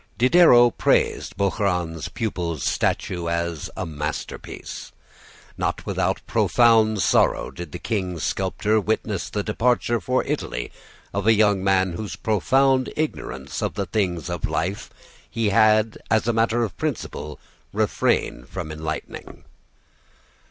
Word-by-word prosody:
Diderot 125 Hz, -2 st, +6 dB
praised -, -, +1 dB
Bouchardon's 90 Hz, -5 st, -1 dB
pupil's 85 Hz, -, -3 dB
statue 85 Hz, -2 st, -1 dB
as 85 Hz, -2 st, -2 dB
a 95 Hz, -, -2 dB
masterpiece. 75 Hz, -1 st, -6 dB, 0.7 s
Not -, -, -2 dB
without -, -, -1 dB
profound 110 Hz, -4 st, +3 dB
sorrow -, -, +2 dB
did 80 Hz, +3 st, -8 dB
the -, -, -5 dB
king's 90 Hz, -7 st, -3 dB
sculptor 105 Hz, +3 st, 0 dB
witness 105 Hz, -2 st, -2 dB
the 105 Hz, -, -2 dB
departure 120 Hz, +2 st, +1 dB
for 130 Hz, 0 st, 0 dB
Italy -, -, -3 dB, 0.4 s
of 100 Hz, +1 st, -2 dB
a 110 Hz, -, +7 dB
young 105 Hz, -3 st, +3 dB
man 95 Hz, -1 st, +2 dB
whose 105 Hz, +4 st, -5 dB
profound 130 Hz, +5 st, +2 dB
ignorance 155 Hz, 0 st, -4 dB
of -, -, -2 dB
the 100 Hz, -1 st, -1 dB
things 90 Hz, -4 st, -1 dB
of 85 Hz, -4 st, -2 dB
life 95 Hz, +3 st, -2 dB, 0.4 s
he 115 Hz, -2 st, 0 dB
had, 110 Hz, +2 st, +3 dB
as 110 Hz, +1 st, +2 dB
a 120 Hz, -, +2 dB
matter 115 Hz, +1 st, +2 dB
of 110 Hz, -, -4 dB
principle, 75 Hz, 0 st, -4 dB, 0.3 s
refrained -, -, 0 dB
from 85 Hz, -5 st, -5 dB
enlightening. 80 Hz, 0 st, -6 dB
100 Hz, 125 wpm, -23 LUFS, 85-110 Hz, 0.7 s, a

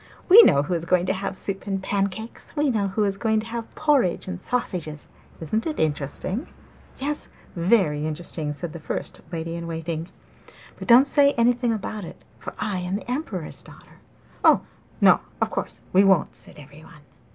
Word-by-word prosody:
'We 415 Hz, +6 st, +11 dB
know 140 Hz, -, +5 dB
who 160 Hz, -, -3 dB
is 165 Hz, -1 st, -1 dB
going 180 Hz, 0 st, +2 dB
to 185 Hz, -, +1 dB
have 195 Hz, 0 st, -4 dB
soup 195 Hz, +1 st, -4 dB
and 195 Hz, -1 st, -1 dB
pancakes; 200 Hz, +6 st, -3 dB
we 295 Hz, -2 st, +2 dB
know 210 Hz, -4 st, 0 dB
who 195 Hz, +3 st, 0 dB
is 200 Hz, -1 st, 0 dB
going 220 Hz, +1 st, +1 dB
to -, -, -10 dB
have 230 Hz, 0 st, -6 dB
porridge 285 Hz, -, +2 dB
and 90 Hz, -1 st, -4 dB
sausages 170 Hz, -11 st, -3 dB, 0.3 s
isn't 215 Hz, -, -1 dB
it 310 Hz, -, -3 dB
interesting?' 155 Hz, -, -2 dB, 0.5 s
'Yes, 295 Hz, +2 st, -2 dB, 0.3 s
very 170 Hz, -5 st, +2 dB
interesting!' 155 Hz, -1 st, -3 dB
said 160 Hz, +2 st, -6 dB
the 170 Hz, -, -7 dB
first 155 Hz, -, -3 dB
lady 165 Hz, -1 st, -4 dB
in 170 Hz, 0 st, -5 dB
waiting. 165 Hz, 0 st, -4 dB, 0.7 s
'But -, -, -7 dB
don't 245 Hz, +3 st, +8 dB
say 280 Hz, 0 st, +4 dB
anything 240 Hz, +1 st, +2 dB
about 215 Hz, -1 st, -4 dB
it, 170 Hz, -, -10 dB, 0.2 s
for -, -, -8 dB
I 210 Hz, -3 st, -2 dB
am 180 Hz, +1 st, -3 dB
the 230 Hz, +4 st, -5 dB
Emperor's 225 Hz, -, -4 dB
daughter.' -, -, -17 dB, 0.4 s
'Oh, -, -, +6 dB, 0.4 s
no, -, -, +7 dB, 0.2 s
of -, -, 0 dB
course -, -, -5 dB
we 190 Hz, +2 st, +6 dB
won't!' 190 Hz, -5 st, +3 dB
said -, -, -10 dB
everyone. 150 Hz, +2 st, -14 dB
190 Hz, 180 wpm, -24 LUFS, 165-230 Hz, 0.7 s, We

